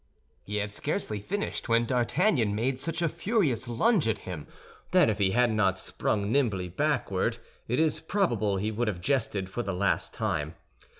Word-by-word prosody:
He 105 - -6
had 105 0 -2
scarcely 140 - -2
finished, 200 - -3
when 115 +1 +4
D'Artagnan 125 - +2
made 130 +4 -1
such 165 +3 -1
a - - +3
furious 155 - 0
lunge 175 - +2
at 110 - +1
him 85 -5 -6 0.4
that - - +5
if 105 - -4
he 100 -2 +3
had 120 +3 +3
not 95 -3 +2
sprung 100 +2 -1
nimbly 105 -10 +1
backward, 115 - 0 0.3
it 125 - 0
is 160 -2 +2
probable 120 - 0
he 105 +3 -1
would 115 +2 -1
have 100 -5 -2
jested 105 -4 0
for 110 +6 -3
the 100 -4 -3
last 100 +2 0
time. 75 +3 -2
115 Hz, 175 wpm, -28 LUFS, 100-145 Hz, 0.4 s, that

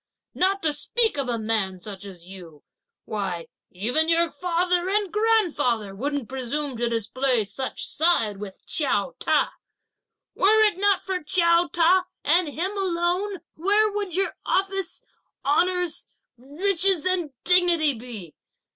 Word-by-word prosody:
Not 390 +1 0
to 310 -2 +2
speak 450 +8 0
of 265 -3 -2
a 235 - -1
man 215 -4 -1
such 200 +1 -9
as 180 -4 -12
you, 175 -5 -13 0.4
why 190 -5 -4 0.2
even 245 - +1
your 335 0 +2
father 360 +1 0
and 405 -3 0
grandfather 325 - +1
wouldn't 280 +3 -3
presume 265 +2 -3
to 240 0 0
display 235 +2 +1
such 210 +6 -4
side 255 - +1
with 195 -1 -10
Chiao 205 -10 +1
Ta. - - +1 0.8
Were 435 +3 +4
it 415 -4 +2
not 400 -1 +3
for 375 -1 -3
Chiao 340 +2 +3
Ta, 355 +2 +3 0.2
and 340 +3 +3
him 335 +6 -1
alone, 365 0 0
where 415 +5 +2
would 405 -4 -3
your 375 -4 0
office, 390 -1 -1 0.4
honours, 355 +3 +1 0.3
riches 340 +6 0
and 370 -4 +1
dignity 350 -4 +4
be? 220 -9 -9
325 Hz, 135 wpm, -24 LUFS, 235-370 Hz, 0.8 s, Were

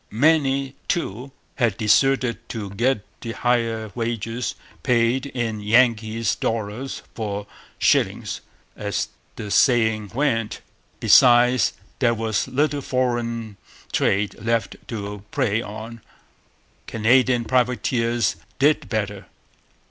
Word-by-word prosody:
Many, 135 +1 +2
too, 135 - -2 0.3
had 120 -7 +1
deserted 125 +2 +3
to 105 -4 -5
get 120 +1 0 0.2
the 115 -1 -5
higher 115 -3 0
wages 115 0 -3 0.3
paid 125 +1 +2
in 115 -5 -3
'Yankees' 110 0 +2
'dollars 115 +4 -3
for 105 -2 -4 0.3
shillings,' - - +1 0.3
as - - -2 0.3
the 105 - -6
saying 110 -4 +3
went. 120 -6 0 0.4
Besides, 125 -2 +5 0.3
there 120 -3 +3
was 110 0 -1
little 145 +2 0
foreign 120 -4 -2 0.3
trade 100 +1 +1
left 115 +1 0
to 105 -3 -6
prey 110 +1 0
on. 110 +1 -8 0.9
Canadian 120 +2 +3
privateers 120 -2 +1 0.2
did 145 -1 +2
better. 105 -3 -3
115 Hz, 100 wpm, -23 LUFS, 110-125 Hz, 0.9 s, Besides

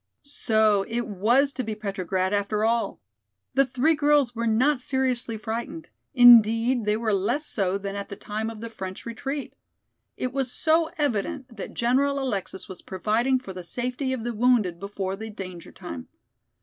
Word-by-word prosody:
So 220 -7 +2
it 235 +1 -2
was 235 +8 +2
to 255 - -3
be 220 -2 -4
Petrograd 190 -2 -2
after 205 +1 0
all! 230 +1 0 0.5
The 275 -1 +3
three 260 +6 +2
girls 290 -4 +3
were 235 0 -1
not 255 +6 +3
seriously 255 -3 -1
frightened; 235 +9 -5 0.2
indeed, 235 0 +7
they 210 0 +2
were 220 -2 0
less 205 +10 0
so 195 -6 0
than 200 0 -5
at 200 0 -5
the 200 - -6
time 215 +3 -4
of 220 -1 -9
the 230 - -5
French 190 -3 -7
retreat. 270 +5 -5 0.6
It 255 0 -3
was 265 -2 -1
so 320 +2 +2
evident 260 -1 -2
that - - -7
General 270 +4 +2
Alexis 200 -7 -3
was 190 - -9
providing 220 +7 +1
for 225 -7 -8
the 180 -1 -7
safety 250 +7 -2
of 255 -4 -3
the 240 0 -2
wounded 220 -7 +2
before 195 -1 -4
the 220 +2 -7
danger 185 -4 -8
time. 85 -1 -8
230 Hz, 170 wpm, -25 LUFS, 200-260 Hz, 0.6 s, indeed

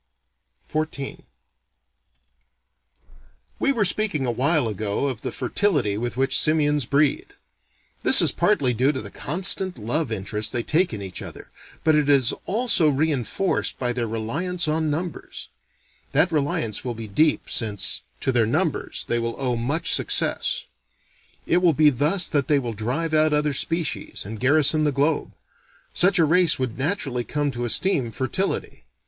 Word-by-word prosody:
XIV 155 -3 -4 2.3
We 275 - +2
were 225 -6 +1
speaking 185 -7 0
a 120 - 0
while 140 +2 +1
ago 105 +3 -3
of 130 -5 -3
the 130 - -4
fertility 130 - 0
with 120 +3 -4
which 135 0 +2
simians 150 -3 +1
breed. 145 0 0 0.7
This - - +9
is - - +5
partly 130 -3 +1
due 130 +5 +2
to 130 - -4
the 100 -2 -7
constant 185 +4 +3
love 120 +5 -2
interest 105 +1 -3
they 120 - -1
take 175 +8 +1
in 105 -3 -6
each 95 -2 -6
other, - - -10 0.3
but 160 - +3
it 150 -1 +1
is 135 -4 +4
also 210 -7 +2
reenforced 150 +5 -1
by 125 -1 -2
their 120 -1 -2
reliance 155 +11 -2
on 155 0 0
numbers. 165 +2 -5 0.6
That 175 - +3
reliance 140 -8 -1
will 125 -2 -4
be 110 0 -8
deep, 150 +10 +1
since, 105 -4 -1 0.2
to - - 0
their 120 -3 +2
numbers, 155 +5 -1
they 120 - 0
will 115 0 -3
owe 125 -3 -1
much 140 +9 -1
success. - - 0 0.8
It 175 - +2
will 180 -2 +3
be 150 +1 +4
thus 150 +8 +2
that 145 -4 -1
they 145 - +3
will 120 -4 -3
drive 130 +10 -3
out 155 0 +3
other 150 -1 0
species, 165 - -2
and 110 +2 -7
garrison 155 +3 +3
the 150 - +1
globe. 145 +3 -1 0.6
Such 195 +2 +3
a 165 - +4
race 170 +1 +3
would 130 -2 -4
naturally 135 -5 -1
come 145 +2 -2
to 120 -1 -4
esteem 130 - +1
fertility. 135 - -3
145 Hz, 155 wpm, -23 LUFS, 120-160 Hz, 2.3 s, This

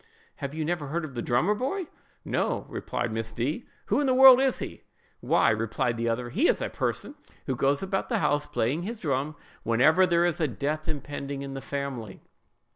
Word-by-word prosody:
have 140 +1 -5
you 155 -1 -2
never 165 -3 -2
heard 160 +3 -2
of 140 - -9
the 120 - -3
drummer 125 - +2
boy?"—"No," 295 - -3
replied 120 -2 -3
Miss 115 0 -3
D——; 145 - -2 0.2
"who 215 - +1
in 285 - +1
the 260 - +3
world 260 -1 +9
is 265 -2 +2
he?"—"Why," 115 - -1
replied 115 +2 -1
the 115 0 -1
other, 120 +1 -2
"he 280 - +3
is - - +2
a - - -2
person - - -2 0.3
who 130 - -1
goes 140 +6 +1
about 195 0 -2
the - - +1
house 150 -1 +1
playing 135 +9 0
his 225 +6 -4
drum 145 -4 -2 0.3
whenever 130 +11 +4
there 170 -1 +3
is 175 -1 0
a 155 - +3
death 145 - -3
impending 140 -2 -4
in 135 -1 -6
the 135 - -5
family. 135 -9 -5
145 Hz, 195 wpm, -27 LUFS, 125-175 Hz, 0.3 s, world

